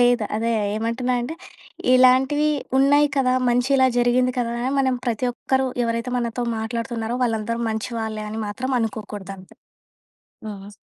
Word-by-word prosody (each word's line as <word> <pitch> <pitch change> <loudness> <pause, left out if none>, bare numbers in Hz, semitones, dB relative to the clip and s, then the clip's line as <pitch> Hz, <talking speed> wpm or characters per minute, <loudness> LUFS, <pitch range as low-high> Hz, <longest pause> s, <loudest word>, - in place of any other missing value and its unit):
లేదు. 245 -2 +4
అదే 230 +1 0 0.3
ఏమంటున్నంటే 245 +4 -1 0.6
ఇలాంటివి 260 +4 +4 0.3
ఉన్నాయి 285 +2 +5
కదా, 255 -2 +3 0.2
మంచి 245 +1 +2
ఇలా 260 -1 +5
జరిగింది 250 +1 +3
కదా 235 -1 0
అని 255 - -1
మనం 260 -1 +2
ప్రతి 240 +1 0
ఒక్కరు 265 +2 0 0.2
ఎవరైతే 230 +2 -2
మనతో 240 0 -2 0.2
మాట్లాడుతున్నారో 230 +1 -3
వాళ్ళందరూ 230 0 -1
మంచి 220 +2 -3
వాళ్ళే 215 -1 -4
అని 220 +1 -4
మాత్రం 250 +6 -4
అనుకోకూడదంతే. 200 -4 -6 0.9
హుహు. 205 0 -8
240 Hz, 135 wpm, -22 LUFS, 220-255 Hz, 0.9 s, ఉన్నాయి